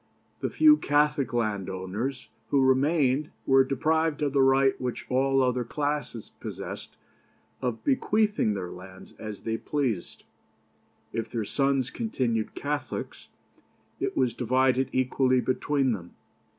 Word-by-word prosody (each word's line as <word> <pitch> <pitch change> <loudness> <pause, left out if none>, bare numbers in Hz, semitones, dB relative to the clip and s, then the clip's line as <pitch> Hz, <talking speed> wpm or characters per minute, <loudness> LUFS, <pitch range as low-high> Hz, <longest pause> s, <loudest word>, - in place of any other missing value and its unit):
The - - -2
few 305 -1 +6
Catholic 150 - +1
landowners 105 +2 -3 0.2
who 140 -2 +3
remained 140 +1 +2 0.2
were 135 0 +6
deprived 155 +3 0
of 140 -2 0
the 140 - +4
right 135 0 +4
which 125 -1 -3
all 135 +1 +3
other 125 -1 +1
classes 145 -2 -3
possessed - - -7 0.6
of 120 -3 -3
bequeathing 215 - +2
their 90 -3 -5
lands 95 +1 -12
as 110 -2 -7
they 115 0 -2
pleased. 125 -12 -2 0.9
If 115 -1 -3
their 115 -2 -3
sons 135 +1 +1
continued 125 - -2
Catholics, 145 -3 -4 0.7
it - - -2
was 125 -3 +2
divided 130 +2 +2
equally 130 0 +2
between 130 +1 +1
them. 85 -6 -6
130 Hz, 125 wpm, -27 LUFS, 115-145 Hz, 0.9 s, few